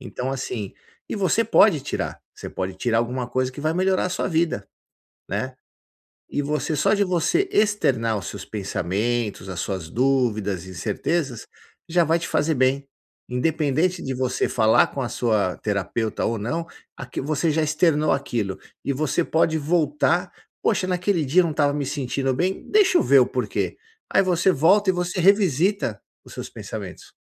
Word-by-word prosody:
Então 130 0 -4
assim, 120 -6 -4 0.4
e - - -3
você - - +2
pode - - +5
tirar, - - -4
você - - -8
pode 95 0 -4
tirar 115 +3 0
alguma 125 +1 -2
coisa 130 0 -1
que 145 - -8
vai 155 +2 0
melhorar 185 +1 +2
a - - -2
sua - - -1
vida, 160 - 0 0.6
né. 130 0 -3 0.8
E 145 - -1
você 150 +1 -1
só 145 - +3
de 205 -1 +3
você 185 - +1
externar 135 - +2
os 95 - -6
seus 100 - -7
pensamentos, 105 +1 -2
as 90 - -5
suas 95 -5 -4
dúvidas, 110 -7 0
incertezas, 115 - -2 0.4
já 175 +1 +4
vai 165 +2 +3
te 170 - -4
fazer 160 +1 +1
bem, 135 +2 +1 0.4
independente 160 +6 0
de 135 - -3
você 130 0 0
falar 110 -2 +4
com 140 - -5
a 120 - -2
sua 105 -6 0
terapeuta 105 +2 -2
ou 115 - 0
não, 160 +11 -3 0.3
aqui 125 -2 -6
você 155 +3 0
já 160 +1 +1
externou 155 0 +2
aquilo 115 -8 -2 0.3
e 140 - 0
você 155 +4 0
pode 160 0 +2
voltar, 160 +3 +1 0.3
"Poxa 185 - +1
naquele 180 -2 0
dia 160 +8 +4
eu - - +1
não 165 - -1
estava 145 -2 +2
me 145 -2 -2
sentindo 135 -1 -1
bem, 185 +6 -1
deixa 395 -4 +5
eu - - +1
ver 140 - +6
o - - +4
porquê." 125 -5 -2 0.4
Aí - - +6
você 185 +1 +3
volta 190 +6 +4
e - - +4
você 180 +1 -2
revisita 190 - +2 0.2
os - - -12
seus - - -6
pensamentos. - - -8
140 Hz, 170 wpm, -23 LUFS, 120-170 Hz, 0.8 s, ver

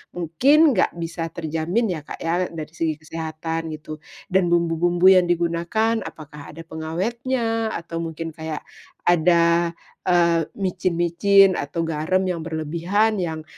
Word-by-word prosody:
mungkin 270 - +4
gak 185 - +1
bisa 165 0 -4
terjamin 170 +7 -1
ya, 155 - -5
Kak, - - -7
ya 175 +2 0
dari 155 -1 -8
segi 160 -2 -1
kesehatan, 160 +1 -5
gitu. 155 0 -9 0.3
Dan 190 -2 +3
bumbu-bumbu 175 +1 +1
yang 180 -1 +4
digunakan 175 +7 0
apakah 150 -1 -10
ada 165 - -8
pengawetnya 225 - -2
atau 170 0 -6
mungkin 165 0 -5
kayak 160 -1 -6 0.4
ada, 170 0 +3 0.3
eee, 170 -3 +3
micin-micin 185 +1 +3
atau 165 +4 -3
garam 165 +4 0
yang 180 -2 -2
berlebihan 170 +7 0
yang 160 -3 -3
170 Hz, 130 wpm, -22 LUFS, 160-185 Hz, 0.4 s, mungkin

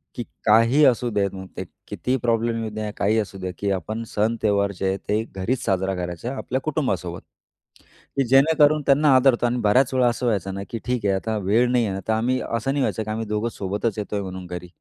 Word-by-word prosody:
की 120 - -3 0.2
काही 115 +7 +5
असू 125 -2 +3
देत 100 -2 +1 0.3
ते - - -3 0.2
कितीही 130 +1 -1
प्रॉब्लेम 115 -1 0
येऊ 110 - -3
द्या, 110 0 -4
काही 105 +3 +2
असू 100 -2 -4
दे, 95 -1 -4
की 100 -1 -1
आपण 110 +4 -3
सण-त्योहार 105 -2 +1
जे 95 - 0
आहेत 95 +1 -1
ते 105 +2 +1
घरीच 115 +7 -2
साजरा 95 0 0
करायचा 90 +8 -4
आपल्या 130 +1 -3
कुटुंबासोबत, 95 - -2 1.0
की 135 - +3
जेणेकरून 150 +3 +5
त्यांना 140 +1 +4
आदरतो 130 -2 +4
आणि 120 +1 0
बऱ्याच 125 +5 +3
वेळा 130 -1 +3
असं 120 +1 -1
व्हायचं 100 -4 0
ना, 100 - -5
की 115 - -4
ठीक 125 -4 -1
आहे 100 - +3
आता 110 +3 -2
वेळ 115 +6 +3
नाही 125 -2 +2
आहे 100 - -2
ना, 95 - -4
तर 110 - +2
आम्ही 120 +4 +1
असं 115 +3 -2
नाही 140 0 0
व्हायचं, 110 - -1
की 110 - -8
आम्ही 110 +1 -3
दोघं 105 +2 -1
सोबतच 100 +2 -3
येतोय 105 0 -3
म्हणून 95 -1 -7
घरी 90 0 -7
110 Hz, 215 wpm, -23 LUFS, 100-125 Hz, 1.0 s, काही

